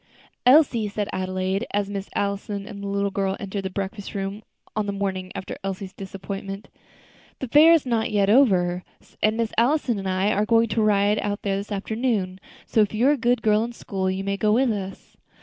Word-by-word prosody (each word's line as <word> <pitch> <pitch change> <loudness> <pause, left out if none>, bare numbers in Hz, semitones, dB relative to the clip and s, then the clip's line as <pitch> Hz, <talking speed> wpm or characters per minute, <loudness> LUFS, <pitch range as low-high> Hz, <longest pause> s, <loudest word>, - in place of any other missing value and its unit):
"Elsie," 255 -6 +5
said 205 0 -3
Adelaide, 185 +3 -2
as 205 -1 +1
Miss 200 -1 -5
Allison 200 0 -2
and 200 -2 -8
the 200 - -5
little 200 0 -1
girl 195 0 -1
entered 200 0 -4
the - - -1
breakfast 195 +2 -5
room 195 +1 -3 0.3
on 215 -1 -1
the - - 0
morning 190 -2 -3
after - - -5
Elsie's 190 0 -5
disappointment, 195 0 -7 0.7
"the 265 - -5
fair 300 +7 +7
is 330 -4 +4
not 230 -3 +1
over 195 -4 +3 0.2
yet, - - -25
and 215 +1 +2
Miss 230 -1 -1
Allison 245 -3 +2
and 195 -1 -3
I 190 +3 +1
are 205 0 +1
going 230 0 +4
to 220 +2 0
ride 210 0 +3
out 205 0 -3
there 195 -1 0
this 200 +2 -6
afternoon; 205 -2 -1 0.3
so, 220 - +2
if 210 0 +1
you 240 +6 +4
are - - +6
a - - +3
good 240 -2 +1
girl 215 0 +3
in 240 +1 -5
school, 190 -4 -3
you 190 +1 -2
may 200 0 -1
go 210 +1 +2
with 250 +1 +3
us." 195 -2 -6
200 Hz, 205 wpm, -24 LUFS, 195-220 Hz, 0.7 s, fair